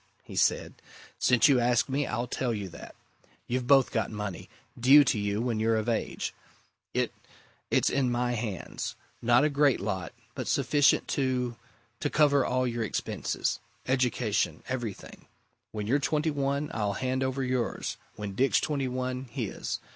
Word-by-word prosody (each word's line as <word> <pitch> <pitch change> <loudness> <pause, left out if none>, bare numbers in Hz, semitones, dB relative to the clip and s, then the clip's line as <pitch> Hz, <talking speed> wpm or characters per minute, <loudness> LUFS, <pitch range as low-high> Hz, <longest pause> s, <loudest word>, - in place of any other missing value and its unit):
he - - -10
said. - - +1 0.4
"Since 125 -3 +5
you 135 -3 +5
ask 120 0 +2
me, 140 +1 -1
I'll 120 +2 -1
tell 125 -1 -2
you 100 -3 -5
that. 85 - -11 0.5
You've 125 0 -2
both 135 -2 +5
got 115 - 0
money 105 -4 -5 0.3
due 135 +5 +8
to 125 -4 +1
you 100 +1 -1
when 120 -3 -1
you're 115 +1 +2
of 110 +1 -1
age. 115 -2 -2 0.6
It - - 0 0.6
it's - - +2
in 135 -2 +1
my 120 0 0
hands. 110 -5 -4 0.3
Not 120 +3 +4
a - - +5
great 140 -2 +3
lot 95 -2 -3 0.2
but - - -5
sufficient 140 0 +3
to 125 -3 0 0.4
to 145 - -1
cover 145 -3 +4
all 130 0 +1
your 120 -2 -1
expenses. 110 - -2 0.3
Education 125 -4 0
everything. 120 -6 -6 0.4
When 105 -1 -4
you're 135 +7 +2
twenty 150 +2 0
one, 140 +1 -1
I'll 105 -3 0
hand 130 +3 -1
over 130 +1 -1
yours 125 -2 -2 0.2
when 105 -1 -5
Dick's 135 +7 +3
twenty 140 -3 -1
one, 130 +1 -3
his. 115 -3 -4
125 Hz, 160 wpm, -28 LUFS, 110-135 Hz, 0.6 s, due